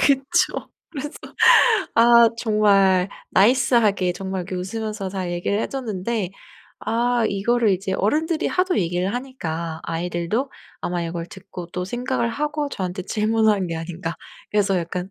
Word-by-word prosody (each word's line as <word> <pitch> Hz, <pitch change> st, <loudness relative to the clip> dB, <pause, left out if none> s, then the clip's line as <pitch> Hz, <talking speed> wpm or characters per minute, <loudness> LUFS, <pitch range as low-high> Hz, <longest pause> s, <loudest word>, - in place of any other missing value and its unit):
그쵸. 285 Hz, +7 st, +1 dB, 0.2 s
그래서 295 Hz, -1 st, -5 dB, 0.8 s
아 235 Hz, 0 st, +7 dB
정말 200 Hz, -5 st, +3 dB, 0.2 s
나이스하게 210 Hz, -4 st, +3 dB
정말 190 Hz, 0 st, -4 dB
그 185 Hz, -, -6 dB
웃으면서 210 Hz, +1 st, -4 dB
잘 185 Hz, -2 st, -4 dB
얘기를 175 Hz, +4 st, -1 dB
해 -, -, -1 dB
줬는데 220 Hz, -5 st, -3 dB, 0.5 s
아 235 Hz, +2 st, +1 dB
이거를 220 Hz, +3 st, +1 dB
이제 190 Hz, +1 st, -1 dB
어른들이 310 Hz, -, 0 dB
하도 365 Hz, 0 st, +1 dB
얘기를 180 Hz, +2 st, 0 dB
하니까 170 Hz, -11 st, -4 dB
아이들도 175 Hz, +9 st, -2 dB, 0.3 s
아마 175 Hz, -1 st, -2 dB
이걸 170 Hz, 0 st, -4 dB
듣고 175 Hz, -1 st, -9 dB
또 180 Hz, 0 st, -3 dB
생각을 240 Hz, +3 st, -1 dB
하고 295 Hz, +4 st, -2 dB
저한테 185 Hz, -5 st, -4 dB
질문한 215 Hz, -1 st, +1 dB
게 165 Hz, -, -4 dB
아닌가. 165 Hz, +1 st, -5 dB, 0.4 s
그래서 200 Hz, -2 st, +2 dB
약간 180 Hz, +2 st, -4 dB
200 Hz, 305 characters per minute, -22 LUFS, 180-240 Hz, 0.8 s, 아